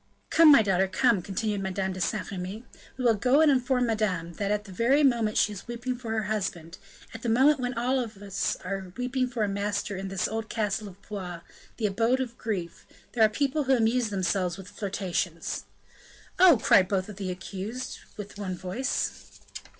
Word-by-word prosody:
"Come, 325 -2 +8
my 275 -6 +7
daughter, 190 -1 +2
come," 205 +2 +2
continued 200 +2 -2
Madame 190 0 -2
de 185 - -6
Saint 215 +4 -2
Remy; 195 +5 -6 0.3
"we 255 - -3
will 235 - +6
go 250 +7 +3
and 315 -2 +6
inform 255 -1 +2
madame 190 -7 -1
that 200 -1 -1
at 210 0 0
the 200 - -12
very 250 +10 +3
moment 235 -5 +2
she 210 - +3
is 200 - -10
weeping 245 +2 -3
for 240 -2 -8
her 220 -1 0
husband, 185 -5 -3 0.3
at 225 - -8
the 235 - -2
moment 270 +6 +5
when 250 0 -2
we - - -13
are 205 -6 -2
all 185 -1 -11
weeping 255 +1 0
for 240 -3 -2
a - - +1
master 200 0 -2
in 190 +1 -4
this 190 -1 -1
old 225 +1 -4
castle 210 -1 -1
of 195 0 -12
Blois, 180 -5 -6 0.4
the 225 - -1
abode 230 +5 +2
of 245 -3 -3
grief, 185 -7 -4 0.2
there 230 - +3
are 215 - +6
people 280 +5 0
who 265 0 +4
amuse 230 0 +2
themselves 185 -2 0
with 190 -2 -10
flirtations!" 185 -4 -3 0.7
"Oh!" 355 -6 +8
cried 190 -3 +5
both 190 -1 0
the 195 -2 -6
accused, 195 +7 -5 0.2
with 205 0 -8
one 185 -3 -3
voice. 190 +10 -3
210 Hz, 190 wpm, -27 LUFS, 190-245 Hz, 0.7 s, Come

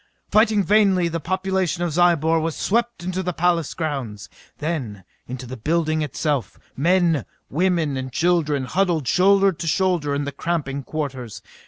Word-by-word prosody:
Fighting 215 -1 +4
vainly, 195 -4 +3
the 165 0 -3
population 185 0 -1
of 175 - -1
Zyobor 165 -1 +3
was 160 0 -2
swept 235 -1 -1
into 185 +1 -2
the 180 -1 -2
palace 170 -2 0
grounds, 130 - -4 0.3
then 135 - -4 0.2
into 130 +1 -6
the 130 +2 -7
building 155 +4 0
itself. 145 - -2 0.2
Men, 170 -2 +2 0.3
women 170 -2 +1
and 130 0 -5
children 155 -2 +1
huddled 175 -3 0
shoulder 195 +5 +4
to 165 -1 -6
shoulder 170 -5 +1
in 145 - -1
the 140 - -4
cramping 140 -4 -2
quarters. 130 -8 -5
165 Hz, 150 wpm, -22 LUFS, 140-180 Hz, 0.3 s, Fighting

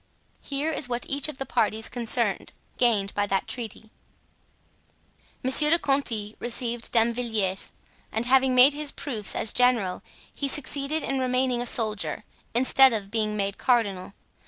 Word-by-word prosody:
Here 285 +3 -2
is 280 -5 -2
what 240 0 -3
each 280 +1 -1
of 305 - -7
the 270 - -4
parties 220 -3 0
concerned 235 -3 +1 0.3
gained 215 -5 +1
by 205 0 -1
that 195 -1 -1
treaty: 220 -2 -6 1.5
Monsieur 265 +4 +5
de 335 - +4
Conti 235 -9 -1
received 240 0 -3
Damvilliers, 225 -5 0 0.4
and 225 +2 -1
having 260 0 +3
made 255 +3 +7
his 295 0 -3
proofs 225 -8 -3
as 220 - 0
general, 240 -7 +1 0.3
he 280 - -3
succeeded 290 +2 0
in 270 -1 -2
remaining 255 -1 0
a 245 - -3
soldier, 215 -3 -1 0.3
instead 260 +1 +5
of 200 -3 -4
being 215 -1 -1
made 200 -1 -3
cardinal. 200 -7 0
240 Hz, 145 wpm, -25 LUFS, 215-265 Hz, 1.5 s, made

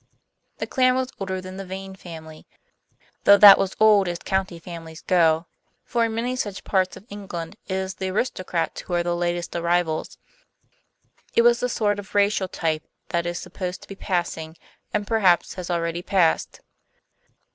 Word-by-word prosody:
The - - -3
clan 255 -1 +3
was 260 0 -1
older 190 -1 -3
than 185 0 -9
the 195 - -5
Vane 190 +1 -7
family, 160 -4 -11 0.8
though 200 - +8
that 200 -1 +10
was 190 -1 -1
old 210 -3 +6
as 175 -1 -2
county 190 -1 -2
families 165 -1 -10
go. 165 -2 +3 0.4
For 235 -1 +1
in 225 -1 -3
many 245 +3 -1
such 205 -6 -4
parts 185 -2 0
of 200 - -15
England 190 -3 -6
it 190 - -3
is 190 0 -2
the 190 +1 -4
aristocrats 185 -4 -2
who 175 - -4
are 175 - +1
the 175 0 -1
latest 175 0 -2
arrivals. 170 -2 0 1.2
It 235 - +5
was 240 0 +5
the 250 - -1
sort 205 -3 0
of 205 0 -11
racial 200 -1 +2
type 160 -4 -2 0.2
that 170 0 -1
is 175 0 -3
supposed 180 0 -6
to - - -14
be 195 - -8
passing, 170 -4 -3 0.3
and 210 -1 -1
perhaps 195 -6 +3
has 180 -1 -7
already 170 0 -1
passed. 180 -3 +1
185 Hz, 170 wpm, -24 LUFS, 170-205 Hz, 1.2 s, that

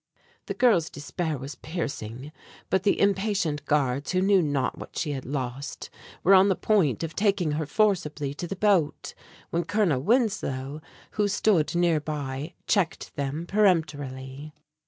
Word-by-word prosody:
The - - -3
girl's 225 -10 +3
despair 155 +2 -3
was 135 +3 -7
piercing; 145 -5 -5 0.4
but 190 - +3
the 200 - +2
impatient 195 -6 +1
guards, 140 -2 +1
who 185 - +2
knew 195 -1 +5
not 145 -5 0
what - - -10
she 155 - -1
had 135 -2 -5
lost, 135 +1 -5 0.3
were 195 - +6
on 190 +1 +7
the 190 - +3
point 170 - +1
of 165 0 -5
taking 195 -6 +1
her 150 0 -2
forcibly 155 -9 +1
to 175 +4 -5
the 195 - -4
boat, 185 -7 +1 0.4
when 170 +1 0
Colonel 170 -7 +1
Winslow, 155 - 0 0.3
who 210 -1 +1
stood 195 -5 +2
near 170 -2 +3
by, 145 0 -5
checked 195 -3 0
them 145 +3 -3
peremptorily. 150 -7 0
155 Hz, 150 wpm, -26 LUFS, 145-195 Hz, 0.4 s, on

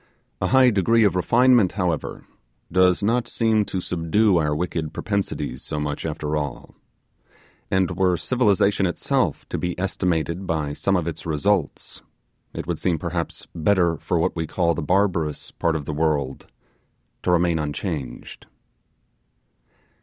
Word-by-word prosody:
A - - +1
high 130 -1 +5
degree 110 +3 +3
of 100 -3 +3
refinement, 120 +1 +4
however, 90 -6 -2 0.5
does 90 +1 +3
not 120 +3 +1
seem 110 -3 +1
to 95 - -3
subdue 90 +4 +2
our 75 -2 +1
wicked 80 -1 -3
propensities 100 - -3
so 75 - -4
much 75 +1 -3
after 75 -1 -3
all; 70 -4 -4 1.0
and 95 -1 +1
were 90 -2 +1
civilization 100 -5 +2
itself 90 - -1
to - - -3
be 90 0 -3
estimated 90 -1 -1
by 75 -3 -1
some 95 +6 0
of 90 -4 0
its 85 0 -5
results, 80 +2 -1 0.5
it - - -6
would 85 -2 -3
seem 90 -3 +1
perhaps 85 +1 -4
better 85 0 +2
for 85 - -1
what 80 - 0
we 80 -1 -2
call 85 0 +1
the 85 - -3
barbarous 90 -3 0
part 85 -1 -1
of 75 -3 -3
the 75 - -3
world 75 -3 -1 0.7
to - - -2
remain 85 -2 +3
unchanged. 75 -3 -5
90 Hz, 145 wpm, -23 LUFS, 80-100 Hz, 1.0 s, high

